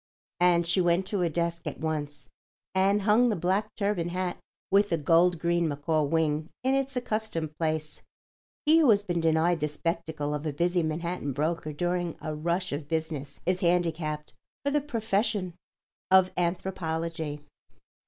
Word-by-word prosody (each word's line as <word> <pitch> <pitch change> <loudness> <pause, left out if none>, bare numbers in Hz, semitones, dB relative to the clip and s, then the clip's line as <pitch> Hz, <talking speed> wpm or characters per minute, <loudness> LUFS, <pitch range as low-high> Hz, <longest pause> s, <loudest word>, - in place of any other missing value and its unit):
And 175 -1 +4
she 175 +2 +3
went 175 +1 +2
to 200 +1 -2
her 175 -2 +2
desk 170 +1 -2
at 150 - -5
once 150 -2 -3 0.5
and 195 +2 +3
hung 225 +4 +4
the 215 - +1
black 190 +5 0
turban 200 -5 0
hat 180 0 -2 0.3
with 200 +1 +4
the 165 - +1
gold 170 +3 +4
green 170 0 +1
macaw 155 +2 0
wing 155 +1 0
in 260 +1 +2
its 275 0 0
accustomed 215 -10 -2
place. 155 -1 -1 0.6
He 315 +2 +6
who 300 -6 +5
has 205 -2 +5
been 175 -4 -1
denied 165 +1 +2
the 150 - 0
spectacle 155 -1 -3
of 150 0 -3
a 150 - -2
busy 175 +4 +1
Manhattan 160 -2 -2
broker 155 +2 -1
during 175 +2 -2
a 155 - -4
rush 170 +4 -1
of 145 0 -4
business 160 -3 -3
is 185 0 +1
handicapped 165 -3 0 0.3
for 280 - +2
the 295 0 +2
profession 220 - -1 0.6
of 185 0 +5
anthropology. 165 -4 -2
170 Hz, 160 wpm, -28 LUFS, 155-190 Hz, 0.6 s, He